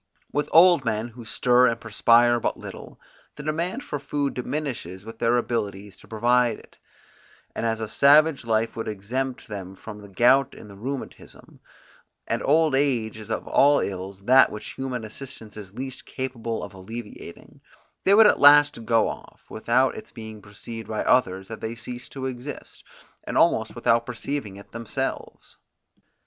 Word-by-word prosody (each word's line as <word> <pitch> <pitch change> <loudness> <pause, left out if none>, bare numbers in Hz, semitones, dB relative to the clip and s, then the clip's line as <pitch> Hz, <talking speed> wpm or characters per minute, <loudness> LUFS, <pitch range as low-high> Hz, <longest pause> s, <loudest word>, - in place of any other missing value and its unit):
With 145 0 -1
old 170 -3 +6
men, 115 0 -2
who 120 0 -12
stir 125 +3 +3
and 115 -1 -1
perspire 120 +2 +4
but - - -2
little, - - -10 0.4
the 150 - -9
demand 170 - -2
for 145 - -4
food 145 0 -2
diminishes 125 - -5
with 115 0 -10
their 120 +1 +2
abilities 105 -5 -3
to - - -18
provide 120 +1 +2
it; - - -19 0.7
and 115 - -2
as 115 0 -1
a 110 - -3
savage 145 +4 +5
life 115 0 0
would 115 - -4
exempt 125 +6 -4
them 95 -3 -7
from 105 +1 -10
the 100 - -12
gout 125 +7 +3
and 105 - -12
the - - -12
rheumatism, 130 +6 -8 0.7
and - - -2
old 155 +1 +3
age 130 -6 +1
is 110 0 -10
of 110 - -3
all 145 +1 +4
ills 95 0 -5
that 130 +3 +6
which 105 - -7
human 130 -3 -4
assistance 110 -1 -10
is 100 -2 -10
least 130 0 -7
capable 120 -3 -4
of - - -8
alleviating, 105 -1 -10 0.4
they 195 - +5
would 220 +1 +8
at - - +5
last 145 -4 +6
go 115 -1 +3
off, - - -9
without 125 +4 +1
its 220 0 -10
being 110 -2 -9
perceived 110 +3 -9
by 110 -1 -2
others 95 -6 +2
that 110 +1 -8
they 110 +1 -4
ceased 125 +2 -8
to 135 -1 -5
exist, 130 +2 -7 0.4
and - - -3
almost 110 -1 +2
without 115 -1 +2
perceiving 125 -2 -4
it 100 0 -14
themselves. 115 -1 -5
120 Hz, 165 wpm, -24 LUFS, 110-135 Hz, 0.7 s, would